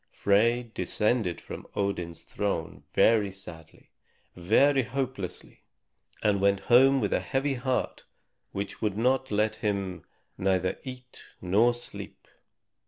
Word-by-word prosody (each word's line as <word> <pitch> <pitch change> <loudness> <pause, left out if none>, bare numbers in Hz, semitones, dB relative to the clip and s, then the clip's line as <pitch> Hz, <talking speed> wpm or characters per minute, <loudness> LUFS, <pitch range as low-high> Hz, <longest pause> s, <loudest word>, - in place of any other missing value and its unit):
Frey 115 +4 +2
descended 105 0 0
from - - -9
Odin's 90 -5 -2
throne 100 -6 -3
very 105 -3 +4
sadly, 85 -4 -13 0.4
very 135 +10 +4
hopelessly, 125 -7 -5 0.6
and 100 -2 +2
went 100 0 +3
home 135 +5 +5
with 105 -5 0
a - - +2
heavy 135 +1 -1
heart 130 0 -2 0.5
which 100 0 -5
would 105 -2 -1
let 110 -3 +1
him 100 -4 -2 0.4
neither 95 -1 0
eat 125 -2 -10 0.2
nor 105 +7 +3
sleep. 120 - -9
105 Hz, 110 wpm, -28 LUFS, 95-125 Hz, 0.6 s, home